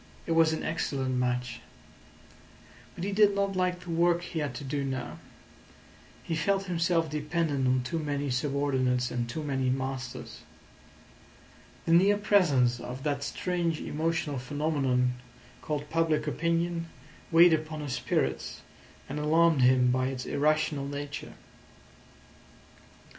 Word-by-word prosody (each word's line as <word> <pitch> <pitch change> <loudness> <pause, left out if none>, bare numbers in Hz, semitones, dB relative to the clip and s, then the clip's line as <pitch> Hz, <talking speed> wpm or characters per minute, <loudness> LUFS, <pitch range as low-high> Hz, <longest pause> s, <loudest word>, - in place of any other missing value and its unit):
It - - -4
was 165 -1 +4
an 160 - -3
excellent 135 -4 -2
match. 125 -1 -1 1.3
But 170 - -6
he 200 - -1
did 205 0 +4
not 200 -1 0
like 180 -1 0
the 180 -1 -7
work 170 +1 +2
he 170 -2 -4
had 145 -5 -3
to 145 - -6
do 140 +1 -2
now. 130 -2 -4 1.0
He 165 - -2
felt 195 +5 +1
himself 170 -2 +1
dependent 150 -2 -1
on 130 0 +2
too 165 +6 -2
many 145 -2 -2
subordinates 130 -2 0
and 120 -1 -2
too 155 +6 -4
many 135 -3 0
masters. 130 -1 -4 1.4
The 165 - +2
near 195 +4 +5
presence 150 - +3
of 125 +2 -7
that 145 -2 -1
strange 170 +1 -1
emotional 155 -3 -2
phenomenon 130 -3 0 0.4
called 150 -1 -3
public 160 -2 +1
opinion 170 +3 -1 0.4
weighed 170 +1 +7
upon 155 0 -2
his 145 -4 -4
spirits, 65 - -2 0.5
and 145 +2 -4
alarmed 160 0 +3
him 125 0 +5
by 130 0 +1
its 130 -1 -4
irrational 150 -1 +1
nature. 145 0 -6
150 Hz, 130 wpm, -29 LUFS, 130-165 Hz, 1.4 s, weighed